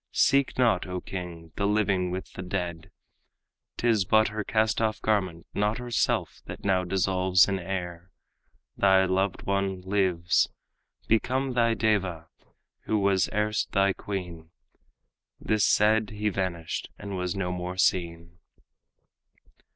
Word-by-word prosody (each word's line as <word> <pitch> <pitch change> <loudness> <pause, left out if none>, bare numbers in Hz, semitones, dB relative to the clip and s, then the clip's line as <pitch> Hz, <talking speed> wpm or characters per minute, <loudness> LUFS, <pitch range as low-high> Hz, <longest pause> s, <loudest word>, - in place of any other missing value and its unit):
Seek 140 0 +3
not, 115 -8 +2
O 90 0 -3
king, 85 -3 -7
the 100 - +1
living 100 -3 +1
with 95 +1 -5
the - - -7
dead! 90 -3 -4 0.9
'Tis 115 -4 +2
but 110 +3 +3
her 105 0 -4
cast 110 +1 +1
off 110 -1 0
garment, 95 -6 -1
not 105 +2 0
herself, 120 -1 -1
That - - -8
now 95 -2 +2
dissolves 95 0 +3
in 95 -1 -1
air. 90 -1 -5 0.7
Thy 95 -1 +4
loved 95 +1 0
one 100 -1 -1
lives, 95 -3 +1 0.6
Become 130 +4 +1
thy 115 -1 +2
deva, 95 -7 0 0.6
who 110 - +1
was 100 -2 +2
erst 105 -1 -1
thy 100 0 +3
queen." 90 -6 -6 0.9
This 110 -3 +1
said, 110 0 +3
he 105 0 -2
vanished, 90 -4 -3
and 100 -1 -6
was 90 0 -2
no 95 -2 -2
more 90 0 -4
seen. 85 -2 0
95 Hz, 130 wpm, -27 LUFS, 90-105 Hz, 0.9 s, Thy